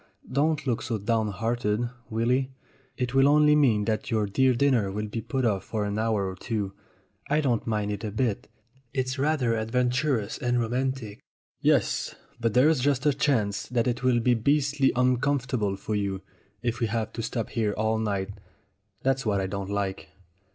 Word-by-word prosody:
Don't 150 +3 +1
look 120 -4 0
so 115 -2 -2
downhearted, 110 +1 0 0.2
Willy; 125 +4 +1 0.5
it 125 -1 -2
will 135 +1 +5
only 150 +1 +5
mean 115 -8 +3
that 110 0 -1
your 110 -2 +1
dear 130 +6 +2
dinner 120 -6 +2
will 105 +2 -3
be 115 +2 -4
put 130 +3 -1
off 100 -4 +1
for 105 -2 -2
an 100 +1 -2
hour 110 -3 +1
or 95 - -4
two. 105 -3 -3 0.6
I 150 +2 +3
don't 125 -7 0
mind 105 -2 0
it 100 -1 -4
a 110 - -2
bit. 110 0 -1 0.5
It's 130 0 -1
rather 140 -5 +1
adventurous 125 +1 0
and 125 -3 +1
romantic!" 120 -2 -2 0.4
"Yes, - - +1 0.2
but 115 -2 0
there's 145 +4 +5
just 140 +1 +1
a 145 - +4
chance 115 -8 0
that 120 -1 0
it 125 -1 -1
will 125 -2 +3
be 125 +1 +3
beastly 140 +3 +2
uncomfortable 125 -4 +1
for 100 +2 -5
you, 100 -2 -2 0.4
if 120 0 -1
we 115 - +1
have 110 0 -2
to 115 - -4
stop 115 -1 -3
here 110 -3 0
all 110 +1 +1
night. 100 -3 -1 0.7
That's 135 0 +1
what 105 -3 +1
I 95 - -1
don't 100 0 -4
like." 100 -1 -3
115 Hz, 175 wpm, -27 LUFS, 105-130 Hz, 0.7 s, will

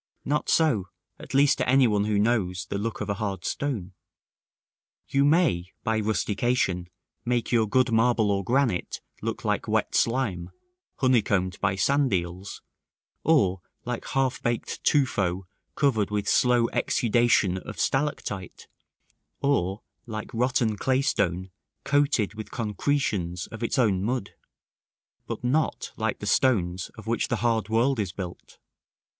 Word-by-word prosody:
Not 150 +1 0
so; 125 - +2 0.3
at - - -7
least 140 +1 +4
to 130 - 0
any 135 0 +5
one 105 -3 +2
who 105 -1 +1
knows 100 -5 +1
the 100 - -1
look 115 +2 -3
of - - -4
a 100 +2 -4
hard 95 -4 -3
stone. 110 -11 -3 1.1
You 140 0 +2
may, 140 - +2
by 110 -2 +1
rustication, 105 -3 0 0.3
make 120 -1 -1
your 115 -3 +3
good 130 +2 +2
marble 115 -2 +3
or 100 0 0
granite 120 -3 0 0.2
look - - -4
like - - 0
wet - - 0
slime, 110 -8 0 0.5
honeycombed 105 -8 +1
by 95 - +1
sand 140 +6 +2
eels, 90 +2 -3 0.6
or 95 - +3 0.2
like 125 -1 -4
half 135 -1 0
baked 120 -1 -2
tufo 100 - +1 0.3
covered 115 -9 +2
with 105 -1 -2
slow 125 -2 +3
exudation 120 -5 +2
of - - -9
stalactite, 135 -9 -2 0.7
or 100 -8 0 0.2
like 110 -2 -6
rotten 120 -2 +1
claystone 100 -9 0 0.3
coated 140 -8 +2
with 110 0 -8
concretions 105 -6 -1
of 110 - -8
its 115 - -1
own 105 -7 +2
mud; 120 -2 -2 1.0
but - - -5
not 145 +6 0
like 110 -1 -1
the - - -7
stones 95 -6 +1
of 110 - -10
which 115 +1 0
the 120 - 0
hard 110 -3 +1
world 120 +3 +2
is 100 -4 -1
built. 90 -2 -8
110 Hz, 140 wpm, -26 LUFS, 95-130 Hz, 1.1 s, any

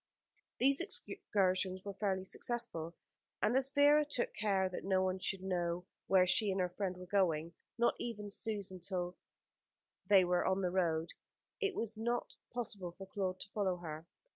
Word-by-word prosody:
These 275 +2 +4
excursions 185 -1 0
were 200 - -4
fairly 190 -2 -1
successful, 190 -8 -2 0.4
and 215 +4 +2
as 265 0 +3
Vera 290 +2 +6
took 290 -5 -2
care 195 -3 +1
that 185 - -5
no 190 -1 +2
one 185 0 0
should 190 0 -2
know 175 -2 -1 0.2
where 190 -1 +6
she 200 +4 +3
and 190 0 0
her 180 -1 +1
friend 185 -1 -2
were 180 - -8
going 170 -4 +1 0.2
not 235 0 +4
even 210 -4 -4
Susan 200 -4 -2
herself 180 0 -2
till - - -36 0.9
they 195 -2 +7
were 180 0 +2
on 190 +1 +1
the 180 - +1
road 165 -3 +1 0.5
it 405 -4 0
was 225 -1 -2
not 240 +2 -1 0.2
possible 200 -7 -3
for 195 - -7
Claude 185 -1 -2
to 200 - -6
follow 190 -4 0
her. 160 -1 -7
190 Hz, 170 wpm, -35 LUFS, 180-215 Hz, 0.9 s, they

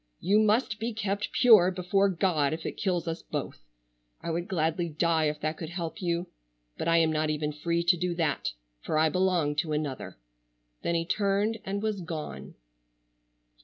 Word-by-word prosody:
You 205 +4 +3
must 215 +1 +2
be 230 +2 -2
kept 205 -1 -2
pure 215 -8 +7
before 190 +2 +1
God 165 -5 +1
if 160 - -6
it - - -1
kills 180 -4 -1
us 165 +1 -3
both. - - -5 0.6
I 170 - -4
would 170 +2 -2
gladly 165 -1 0
die 160 0 +1
if 150 0 -1
that 155 +1 -2
could 160 - -6
help 175 +3 -5
you, 170 -1 0 0.5
but - - -4
I 165 0 +4
am 165 -1 +4
not 155 0 0
even 150 0 -1
free 170 +3 -1
to 175 +1 +4
do 180 0 -1
that, 160 -4 0 0.3
for 155 - -1
I 160 +1 +4
belong 180 -4 +1
to 155 0 0
another." 150 -3 -4 0.6
Then 170 - 0
he 165 0 0
turned 205 +4 0
and 200 +2 -3
was 215 -3 -1
gone. 160 -3 -6
170 Hz, 180 wpm, -28 LUFS, 160-195 Hz, 0.6 s, pure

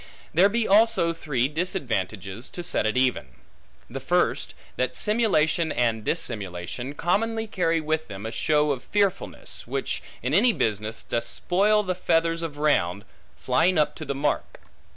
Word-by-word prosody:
There 190 +5 +5
be 230 +2 0
also 200 -5 +4
three 135 -6 -1
disadvantages, 115 - -3
to 175 - -7
set 135 -10 0
it 110 - -1
even. 130 -1 +1 0.6
The - - -6
first, - - 0 0.2
that 125 - -1
simulation 175 -8 +2
and 115 -2 0
dissimulation 105 +5 -3
commonly 225 +7 0
carry 165 -6 0
with 155 0 -2
them 100 0 -8
a 110 - -4
show 150 +3 +2
of 130 -3 -2
fearfulness, 200 -2 -2
which - - -2 0.2
in 125 +3 -1
any 225 +7 +5
business, 110 - -2
doth 115 0 -2
spoil 205 - +2
the 185 -2 -1
feathers, 165 -2 +1
of 160 -3 -5
round 105 - +1 0.3
flying 165 +8 +2
up 150 - +2
to - - -6
the 140 -2 -3
mark. 145 +2 -2
155 Hz, 150 wpm, -25 LUFS, 120-185 Hz, 0.6 s, There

